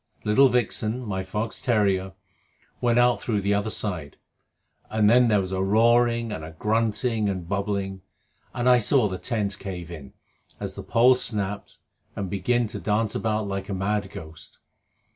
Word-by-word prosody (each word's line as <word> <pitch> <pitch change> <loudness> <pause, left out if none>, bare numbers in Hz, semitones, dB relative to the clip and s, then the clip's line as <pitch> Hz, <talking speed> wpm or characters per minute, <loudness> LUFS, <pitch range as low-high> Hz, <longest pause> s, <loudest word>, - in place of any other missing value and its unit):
Little 130 +6 +5
Vixen, 120 -1 0
my 95 -3 -2
fox 105 +4 -4
terrier, 100 -5 +1 0.7
went 120 -1 +2
out 120 0 +3
through 105 -4 -1
the 100 +1 +1
other 100 +2 0
side; 90 -9 -3 0.7
and 110 -1 +2
then 120 +3 +5
there 105 -2 +3
was 95 -1 -3
a 95 0 -1
roaring 115 +3 +3
and 80 -7 -5
a 80 +1 -8
grunting 110 +1 0
and 90 -3 -4
bubbling, 100 -1 -2 0.5
and 125 0 -2
I 125 -1 +6
saw 120 0 +3
the 95 -2 -5
tent 105 -4 -2
cave 90 -3 -7
in, 75 -6 -10 0.5
as - - -5
the - - -7
pole 125 +3 +4
snapped, 105 -5 -3 0.4
and 95 -3 -4
begin 120 +5 +1
to - - -6
dance 105 0 0
about 110 -1 -1
like 100 0 -4
a 100 - -2
mad 100 +1 -1
ghost. 80 -4 -10
105 Hz, 165 wpm, -25 LUFS, 95-115 Hz, 0.7 s, I